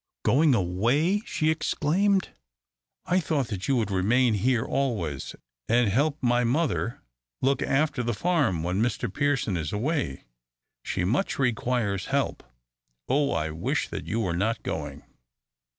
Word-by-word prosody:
"Going 145 0 +4
away!" 120 - +1
she 155 -1 +1
exclaimed; 185 +5 +1 0.8
"I 180 +2 +2
thought 145 -7 -1
that 100 -3 -4
you 135 - +2
would 110 -5 0
remain 115 +6 +3
here 120 +3 +1
always 100 - -2 0.3
and 120 -2 +4
help 140 +7 +1
my 120 0 +3
mother 125 -2 0 0.4
look 135 +1 +1
after 140 -1 +1
the 120 -2 -1
farm 145 - +1
when 90 +4 0
Mr 110 -4 -1
Pearson 145 -9 0
is 80 -3 -3
away. 120 - -2 0.6
She 90 - -2
much 120 - 0
requires 120 -6 0
help. - - -1 0.7
Oh, 140 +1 +2
I 80 -1 -1
wish 80 +2 -2
that 80 - -6
you 110 +7 -1
were 90 -6 -1
not 110 +5 -1
going!" 75 -2 -5
120 Hz, 140 wpm, -26 LUFS, 95-145 Hz, 0.8 s, Going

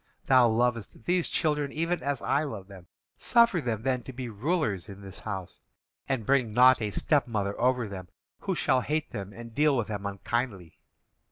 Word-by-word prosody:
Thou 130 -3 +6
lovest 115 -1 -1
these 180 -1 +1
children 150 -3 0
even 165 +3 -1
as 140 0 -2
I 140 - +2
love 110 -11 -5
them. 95 -3 -13 0.3
Suffer 235 -7 +4
them 115 -4 -2
then 130 -1 0
to 130 - -9
be 125 -1 -6
rulers 110 - -1
in 100 0 -10
this 95 -1 -10
house, 95 -4 -6 0.5
and 130 -5 -1
bring 130 -3 +2
not 125 +1 +6
a 105 - -1
stepmother 105 - +1
over 125 -2 +2
them 95 -2 -7 0.3
who - - -2
shall 130 - +2
hate 155 +3 -2
them 100 -1 -6
and 115 +2 -10
deal 145 +1 +3
with 110 -3 -1
them 100 -1 -3
unkindly. 100 -2 -3
120 Hz, 180 wpm, -28 LUFS, 100-140 Hz, 0.5 s, Thou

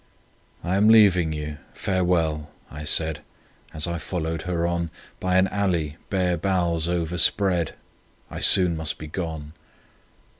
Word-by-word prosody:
"I 90 +3 0
am 105 +2 +4
leaving 95 -7 +5
you... 75 -1 -5 0.2
Farewell!" 85 -5 0 0.2
I 75 0 -8
said, 80 -1 0 0.5
As 75 -1 -2
I 85 -1 -3
followed 80 -1 -3
her 85 -1 0
on 85 -1 -1 0.3
By 90 0 +1
an 95 +1 +4
alley 85 -7 -1
bare 90 -3 0
boughs 85 -2 0
overspread; 85 +1 +1 0.6
"I - - -6
soon 90 -3 +6
must 80 -2 -4
be 80 - -8
gone!" 80 -2 -6
85 Hz, 135 wpm, -24 LUFS, 80-90 Hz, 0.6 s, soon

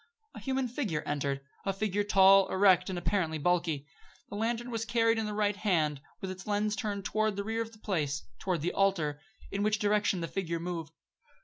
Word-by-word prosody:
A - - -8
human 265 -1 -1
figure 225 - -2
entered; 140 -1 -1 0.2
a 195 - 0
figure 205 +1 -1
tall, 195 -1 +6
erect, 185 -2 +4
and 185 - -3
apparently 175 -3 0
bulky. 165 -2 0 0.4
The - - -6
lantern 235 +3 -1
was 225 -1 -2
carried 230 0 +2
in 220 - -1
the 210 - -3
right 205 -1 +1
hand, 160 -9 +1 0.2
with 190 - -3
its 185 +2 -9
lens 210 0 +1
turned 200 -2 -3
toward 215 0 +1
the 200 - -2
rear 225 +2 -1
of 225 0 -5
the 220 - -16
place 150 -10 -2 0.2
toward 180 -5 -1
the 175 - -1
altar 165 -7 +1 0.3
in 200 - -2
which 215 +1 +2
direction 205 -2 +1
the 165 - -2
figure 170 -3 -3
moved. 165 -3 -4
195 Hz, 200 wpm, -30 LUFS, 170-215 Hz, 0.4 s, tall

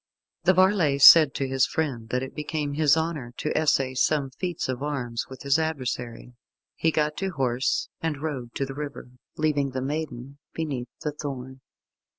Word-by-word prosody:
The 185 - +6
varlet 180 -7 +3
said 155 -4 +9
to 135 - -1
his 130 -3 +2
friend 125 -4 -3
that 125 +2 -1
it 130 - -7
became 150 -1 -3
his 150 +1 +4
honour 155 -7 -3
to 155 - -2
essay 135 -4 +2
some 135 +1 +1
feats 175 +5 -3
of 130 0 -3
arms 125 -5 -3
with 130 - -10
this 140 +2 +2
adversary. 125 -6 -4 0.4
He 165 - +1
got 150 -1 0
to 195 - -1
horse, 130 -6 0
and 160 -3 -2
rode 135 -6 -5
to 135 - -1
the 135 - -7
river, 140 -3 -7 0.3
leaving 145 -3 0
the 130 - -2
maiden 140 -2 -5 0.2
beneath 135 -7 -3
the 150 - -1
thorn. 135 -3 -7
140 Hz, 170 wpm, -25 LUFS, 130-155 Hz, 0.4 s, said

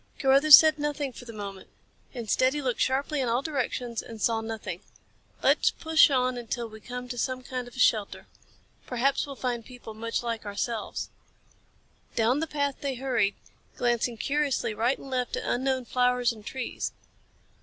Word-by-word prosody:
Carruthers 275 +2 +9
said 310 -1 +5
nothing 290 -2 -2
for 245 - -11
the 235 - -8
moment. 200 -3 -8 0.4
Instead, 255 +3 +1
he 295 - -2
looked 250 -3 -1
sharply 275 +2 +1
in 250 - 0
all 240 +3 +1
directions 250 -5 -2
and 225 -1 -10
saw 225 +1 +1
nothing. 220 -5 -5 0.6
"Let's - - +4
push 320 -1 +4
on 255 -2 0
till 235 +1 -3
we 220 0 -12
come 250 +2 -6
to 245 -1 -4
some 255 0 -2
kind 250 -1 -5
of 245 - -13
a - - -8
shelter. 215 -4 +2 0.6
Perhaps 265 +3 +1
we'll 280 - -7
find 245 -3 -2
people 245 -2 -11
much 230 +2 -3
like 230 -2 -3
ourselves." 215 +2 -3 1.0
Down 235 +5 +2
the 325 - -1
path 285 -2 -1
they 275 -2 -2
hurried, 240 -6 0 0.4
glancing 240 -1 0
curiously 280 -2 0
right 235 +5 +1
and 270 - -11
left 250 -1 -1
at - - -4
unknown 260 0 0
flowers 250 0 +2
and 215 -2 -13
trees. 255 +3 -4
250 Hz, 170 wpm, -27 LUFS, 230-270 Hz, 1.0 s, Carruthers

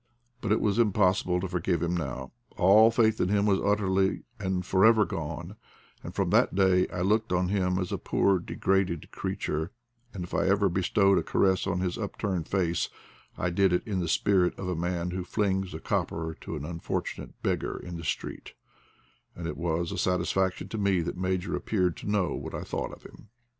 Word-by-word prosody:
But 110 - -2
it 110 - +3
was 105 +1 +1
impossible 95 -4 +2
to 95 - -2
forgive 90 -1 -1
him 85 +1 0
now. 65 -5 -4 0.3
All 105 +4 +7
faith 110 -2 +2
in 90 - +1
him 100 0 +2
was 100 -2 +3
utterly 95 -2 +1 0.2
and 95 -2 -2
for 95 +1 +2
ever 110 -2 +6
gone, 80 -5 -5 0.5
and - - -8
from - - 0
that - - +3
day 95 -1 +4
I 90 - -5
looked 105 +3 +1
on 90 0 +1
him 90 -2 +1
as 90 -1 -2
a - - -2
poor 95 -2 +2
degraded 95 -1 -1
creature; 95 -3 -3 0.4
and 95 - -5
if 85 - -9
I - - +1
ever 100 0 +3
bestowed 95 +1 +3
a - - -3
caress 95 +2 +2
on 90 -1 0
his 90 +1 -2
upturned 100 -5 -3
face, 85 -4 0 0.5
I 90 - -1
did 95 +1 +3
it 90 - +1
in 100 -5 -2
the 85 - -1
spirit 95 -1 +2
of 95 - -5
a 90 - -1
man 90 +1 -2
who 90 0 -3
flings 95 -1 -1
a - - -6
copper 80 0 -2
to - - -5
an 75 -1 -5
unfortunate 85 +1 -4
beggar - - -1
in 90 -1 -7
the 85 - -8
street; - - -4 0.8
and 85 - -6
it 80 -3 -3
was 85 0 -1
a - - -3
satisfaction 95 0 0
to 110 - -4
me 100 -3 +2
that 85 - -3
Major 95 +1 -1
appeared 90 -5 0
to - - -6
know 100 -8 +1
what - - -5
I - - -4
thought - - -4
of - - -13
him. - - -14
95 Hz, 200 wpm, -28 LUFS, 90-100 Hz, 0.8 s, All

